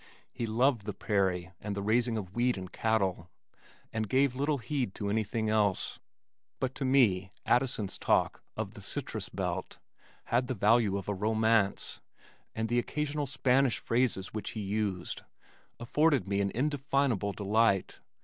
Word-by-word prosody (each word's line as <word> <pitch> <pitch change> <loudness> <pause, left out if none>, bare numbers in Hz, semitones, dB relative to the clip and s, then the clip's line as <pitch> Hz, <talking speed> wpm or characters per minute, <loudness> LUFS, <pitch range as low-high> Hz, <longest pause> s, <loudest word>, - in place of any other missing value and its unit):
He 115 - -3
loved 115 -1 +2
the 105 - -3
prairie 95 -4 0
and 105 -1 -3
the 100 - -3
raising 115 +2 +2
of 95 -3 -6
wheat 120 0 +1
and 95 -1 -7
cattle, 95 -6 0 0.6
and 110 -2 -2
gave 135 +1 +3
little 140 +3 0
heed 125 -3 -2
to 100 -1 -2
anything 110 +1 0
else, 105 -3 +1 0.6
but 130 0 -1
to 135 - -3
me 110 -9 +3 0.2
Addison's 120 -5 +1
talk - - +2 0.2
of - - -3
"the - - -11
citrus - - -4
belt" - - -3 0.5
had 125 +1 +1
the 130 - -2
value 105 -1 +3
of 100 - -6
a 105 - 0
romance, 110 0 +1 0.5
and 110 0 -1
the 120 +2 +2
occasional 150 +2 -2
Spanish 130 -1 +2
phrases 115 -5 0
which 110 - -4
he 110 - -4
used 100 -3 -2 0.6
afforded 140 - +2
me 100 0 +1
an 100 - +1
indefinable 135 -6 +1
delight. 100 -1 +1
110 Hz, 150 wpm, -30 LUFS, 100-125 Hz, 0.6 s, gave